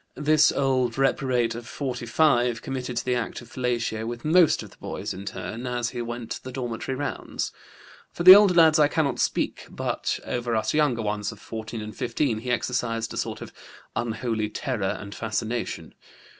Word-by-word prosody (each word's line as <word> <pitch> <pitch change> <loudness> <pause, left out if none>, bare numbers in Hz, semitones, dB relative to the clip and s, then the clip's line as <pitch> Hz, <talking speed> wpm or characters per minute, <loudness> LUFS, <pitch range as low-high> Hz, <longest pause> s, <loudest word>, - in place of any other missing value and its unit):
This 150 +1 +4
old 130 -3 +1
reprobate 130 -3 +1
of 120 +1 -8
45 125 -2 +1
committed 125 -2 -4
the 125 +1 0
act 120 -2 -2
of 120 -1 -14
fellatio 120 -3 -1
with 120 +2 -6
most 165 +1 +4
of - - -12
the - - -19
boys - - -5
in 95 +2 -8
turn 115 +4 -5
as 120 -1 -1
he 120 - -4
went 120 -1 -5
the 130 - -8
dormitory 125 0 -4
rounds. 145 +2 -3 0.6
For 175 - -4
the 185 +1 +13
older 200 -2 +6
lads 160 -2 +6
I 150 - +6
cannot 155 -2 0
speak, - - -1
but - - -2
over 120 -1 -2
us 110 - 0
younger 145 -7 +2
ones 105 0 -2
of 115 - -13
14 110 +1 -6
and 105 0 -7
15 120 -1 -1
he 125 +3 -6
exercised 120 -2 -1
a - - -6
sort - - -3
of - - -9 0.4
unholy 110 -2 -1
terror 105 -4 -2
and 100 -1 -8
fascination. 115 +2 -3
120 Hz, 175 wpm, -25 LUFS, 115-135 Hz, 0.6 s, the